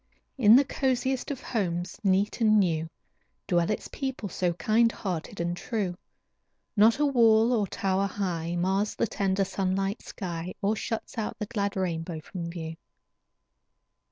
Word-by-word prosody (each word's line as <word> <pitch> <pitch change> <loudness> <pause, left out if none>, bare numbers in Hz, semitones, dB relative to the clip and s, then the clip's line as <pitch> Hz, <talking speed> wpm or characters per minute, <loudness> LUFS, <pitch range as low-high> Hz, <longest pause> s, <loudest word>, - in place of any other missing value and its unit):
In 225 -4 +7
the 275 +2 +6
coziest 260 -1 0
of 275 -3 -4
homes, 180 -6 -2
neat 195 +4 +1
and 215 -1 +5
new, 165 -4 +1 0.6
Dwell 175 -2 +2
its 215 - -2
people 265 -7 -4
so 175 0 0
kind 220 +7 +3
hearted 190 0 -5
and 175 +1 -1
true. 195 -2 -2 0.8
Not 220 +2 +5
a 295 - +2
wall 230 -3 +5
or 210 -4 +1
tower 195 +1 0
high 175 -4 -2
Mars 190 +4 0
the - - +1
tender, 195 -2 0
sunlight 195 +2 -1
sky, 175 -2 -5
Or 210 +1 +1
shuts 225 +1 -4
out 215 - -3
the 210 - -3
glad 200 -1 -2
rainbow 165 -3 -2
from 170 +2 -6
view. 165 -1 -6
195 Hz, 150 wpm, -28 LUFS, 175-225 Hz, 0.8 s, In